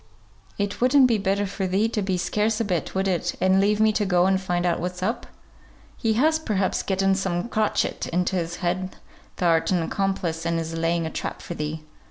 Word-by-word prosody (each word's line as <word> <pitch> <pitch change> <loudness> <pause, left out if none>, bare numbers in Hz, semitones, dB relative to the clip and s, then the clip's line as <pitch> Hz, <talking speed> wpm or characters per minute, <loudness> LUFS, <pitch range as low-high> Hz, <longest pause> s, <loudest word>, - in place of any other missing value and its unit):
"It 205 +1 -3
wouldn't 260 +2 +6
be 230 -4 +2
better 200 +1 0
for 195 0 -3
thee 195 +4 +2
to 225 -2 -2
be 190 -2 0
scarce 210 +4 0
a 230 - 0
bit, 180 -4 -2
would 190 +1 +1
it, 175 -1 -1
and 190 +1 +4
leave 210 +1 +2
me 220 0 +5
to 210 - +1
go 180 -2 +3
and 190 0 +2
find 175 -2 -1
out 175 - +1
what's 180 +1 -4
up? 225 +6 -2 0.7
He 225 -1 0
has, 315 +7 +3
perhaps, 200 -10 0
getten 195 0 +1
some 190 -1 -1
crotchet 215 -2 0
into 180 +2 0
his 175 -1 -2
head 185 +2 -2 0.4
thou'rt 165 -2 +2
an 180 -3 +1
accomplice, 175 -3 -2
and 170 0 0
is 165 0 -4
laying 165 0 0
a 160 - -4
trap - - -4
for - - -5
thee." 155 0 -4
190 Hz, 210 wpm, -24 LUFS, 175-205 Hz, 0.7 s, wouldn't